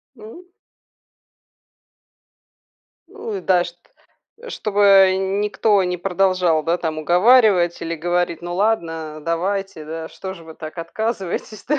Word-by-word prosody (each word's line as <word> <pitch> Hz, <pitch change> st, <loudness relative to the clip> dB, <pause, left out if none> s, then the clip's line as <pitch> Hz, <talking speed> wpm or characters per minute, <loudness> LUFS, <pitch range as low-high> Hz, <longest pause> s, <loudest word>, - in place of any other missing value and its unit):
Ну. 255 Hz, +12 st, -13 dB, 2.6 s
Ну 450 Hz, -2 st, -7 dB
и -, -, -7 dB
да, 180 Hz, -2 st, +2 dB
чт 175 Hz, 0 st, -9 dB, 0.7 s
чтобы 205 Hz, -, -1 dB, 0.3 s
н 190 Hz, +1 st, -1 dB
никто 210 Hz, -1 st, +2 dB
не 180 Hz, 0 st, -2 dB
продолжал, 180 Hz, -3 st, +1 dB
да, 170 Hz, +1 st, +1 dB
там, 160 Hz, -2 st, -3 dB
уговаривать 180 Hz, +1 st, +4 dB
или 165 Hz, 0 st, -3 dB
говорить: 175 Hz, +1 st, -1 dB
"Ну 175 Hz, 0 st, -5 dB
ладно, 165 Hz, -7 st, -1 dB
давайте, 180 Hz, +1 st, -2 dB
да, 160 Hz, +1 st, -6 dB
что 190 Hz, -1 st, -8 dB
же 170 Hz, -, -13 dB
вы 160 Hz, 0 st, -12 dB
так 155 Hz, +2 st, -9 dB
отказываетесь, 205 Hz, +3 st, -4 dB
да?" 300 Hz, +2 st, 0 dB
180 Hz, 125 wpm, -20 LUFS, 165-205 Hz, 2.6 s, уговаривать